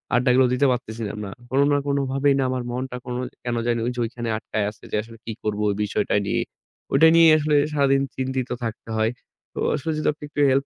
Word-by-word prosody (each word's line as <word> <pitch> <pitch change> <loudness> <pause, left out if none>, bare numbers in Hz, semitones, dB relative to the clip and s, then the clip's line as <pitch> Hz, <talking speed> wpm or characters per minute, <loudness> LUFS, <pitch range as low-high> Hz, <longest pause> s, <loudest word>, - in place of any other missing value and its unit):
আড্ডাগুলো 125 +1 +4
দিতে 130 +3 +2
পারতেছিলাম 110 -4 -4
না। 100 - -6 0.2
কোনো 135 +2 +3
না - - +4
কোনোভাবেই 140 0 +2
না - - +2
আমার 130 -1 -2
মনটা 125 +1 -4
কোনো 125 0 -3 0.2
কেন 120 -1 -2
জানি 120 -1 +1
ওই 125 - 0
যে - - -5
ওইখানে 120 0 -5
আটকায় 110 -1 -2
আছে 105 - -15
যে - - -1
আসলে 115 +1 -13
কি 115 - -4
করব 105 -1 -1
ওই 100 - 0
বিষয়টা 105 - -1
নিয়ে। - - 0 0.5
ওইটা 160 +4 +6
নিয়েই 165 -1 +8
আসলে 150 0 +1 0.2
সারাদিন 140 -2 +3
চিন্তিত 130 -1 -2
থাকতে 115 0 -5
হয়। 110 +1 +2 0.4
তো - - -6 0.2
আসলে 155 +2 -3
যদি 155 - -1
আপনি 150 - -16
একটু 145 - -6
হেল্প 135 +1 +2
125 Hz, 215 wpm, -23 LUFS, 115-140 Hz, 0.5 s, নিয়েই